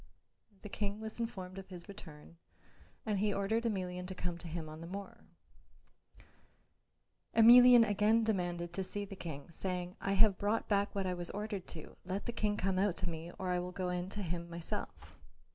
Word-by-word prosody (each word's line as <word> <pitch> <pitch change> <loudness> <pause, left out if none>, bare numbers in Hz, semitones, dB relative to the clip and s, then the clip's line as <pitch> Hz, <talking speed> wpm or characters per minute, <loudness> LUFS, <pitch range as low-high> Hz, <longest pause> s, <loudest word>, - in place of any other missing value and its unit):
The - - -6
King 205 +1 -2
was 220 +1 -6
informed 190 -5 -4
of 195 - -10
his 175 -2 -9
return 165 -5 -11 0.7
and 210 -3 0
he 210 +1 +2
ordered 210 +4 0
Emelian 180 -4 -2
to 190 - -5
come 175 -1 -3
to 175 - -8
him 160 -1 -4
on 155 +1 -9
the 165 - -7
morrow. 195 +2 -8 2.1
Emelian 240 0 +9
again 210 +2 +3
demanded 175 -5 -1
to 190 - -1
see 205 +2 -3
the 195 - -8
King, 160 -4 -7
saying, 180 +1 -3
"I 195 - 0
have 200 -1 +5
brought 210 +3 0
back 200 -1 +1
what 195 -1 0
I 185 - 0
was 175 -1 -3
ordered 205 -2 -4
to; 155 -2 -9
let 185 +2 -3
the - - -1
King 210 -2 0
come 190 0 +1
out 195 -2 +2
to 180 - -1
me, 165 +1 -6
or 185 - -3
I 180 0 +1
will 180 +1 -4
go 180 0 -2
in 180 +1 -2
to 205 0 -4
him 170 -1 -3
myself." 170 0 -6
190 Hz, 195 wpm, -34 LUFS, 175-205 Hz, 2.1 s, Emelian